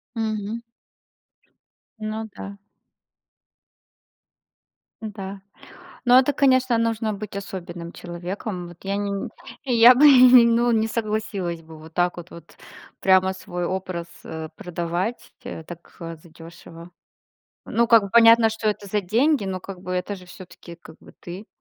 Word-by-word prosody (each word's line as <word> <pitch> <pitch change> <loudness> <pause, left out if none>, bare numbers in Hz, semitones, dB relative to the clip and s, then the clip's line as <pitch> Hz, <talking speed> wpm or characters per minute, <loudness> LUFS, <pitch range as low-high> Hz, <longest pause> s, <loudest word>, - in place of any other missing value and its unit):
Мгм. 220 0 -3 1.4
Ну 220 +1 -5
да. 200 0 -9 2.4
Да. 200 -3 -7 0.6
Но 245 +1 +7
это, 265 +2 +1
конечно, 260 -3 +3
нужно 225 -1 -1
быть 205 0 -8
особенным 175 -3 -7
человеком. 180 +2 -6
Вот 175 - -14
я 195 +1 -2
не 205 0 -2
не. 200 -1 -4 0.5
Я 240 +2 +10
бы 285 +4 +5
ну 245 -3 +7
не 225 -1 +2
согласилась 210 -6 -3
бы 160 0 -13
вот 160 +1 -14
так, 175 0 0
вот 170 -1 -12 0.4
прямо 190 0 +3
свой 180 -1 -5
образ, 185 -2 -4 0.2
э, 160 -1 -7
продавать, 175 +3 -4
э, 160 - -7
так, 170 +1 -12
э, 165 -1 -6
задёшево. 165 +1 -13 0.8
Ну 235 +1 +1
как 230 -2 +7
бы 200 - -6
понятно, 230 0 +6
что 220 0 -2
это 205 -1 -3
за 210 +2 -1
деньги, 235 - +1
но 190 -1 -4
как 185 -1 -9
бы 180 -1 -6
это 180 +3 -2
же 185 -2 -13
всё-таки 180 -2 -12
как 160 -2 -15
бы - - -16
ты. 185 +5 -9
195 Hz, 140 wpm, -23 LUFS, 175-225 Hz, 2.4 s, Я